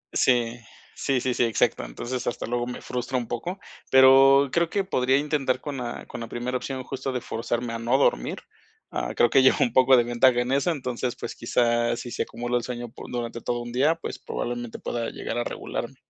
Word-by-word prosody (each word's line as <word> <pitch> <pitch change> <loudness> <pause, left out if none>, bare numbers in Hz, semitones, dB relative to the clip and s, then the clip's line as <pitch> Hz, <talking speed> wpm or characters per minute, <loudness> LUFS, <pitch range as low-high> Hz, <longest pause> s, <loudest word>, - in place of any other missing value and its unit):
Sí, 120 -2 +2 0.4
sí, 135 -2 0
sí, 130 -1 0
sí, - - +1
exacto. 115 - +1
Entonces 120 - -5
hasta 120 - -2
luego 120 +1 -2
me 125 - -6
frustra 125 +1 -3
un 120 -2 -3
poco, 175 - -4 0.3
pero 135 +1 +7
creo 170 -1 +1
que 200 -1 0
podría 130 -7 +2
intentar 145 -3 0
con 145 -2 -5
la 120 -2 -5
con - - -8
la 115 - -5
primera 120 +2 -4
opción 130 0 -5
justo 135 0 -4
de 125 - -2
forzarme 120 +1 -3
a 115 - -4
no 120 +3 +2
dormir. - - +1 0.5
Ah, - - -3
creo 120 - +4
que 135 - +6
llevo 130 - +5
un 120 -2 +2
poco 130 0 +6
de 120 - +4
ventaja 120 +1 +3
en 125 +1 -2
eso, 140 +5 +2
entonces, 125 -5 -2
pues - - -6
quizás 120 0 +1
si 120 - -7
se - - -3
acumula 120 +1 -2
el 120 - -3
sueño 120 -1 -5
po - - -10
durante 120 -1 -4
todo 120 0 -2
un 120 0 -7
día, 145 +6 +3
pues 165 - -7
probablemente 120 -1 -4
pueda 115 -1 -3
llegar 120 - -4
a - - 0
regularme. - - -5
125 Hz, 215 wpm, -25 LUFS, 120-130 Hz, 0.5 s, pero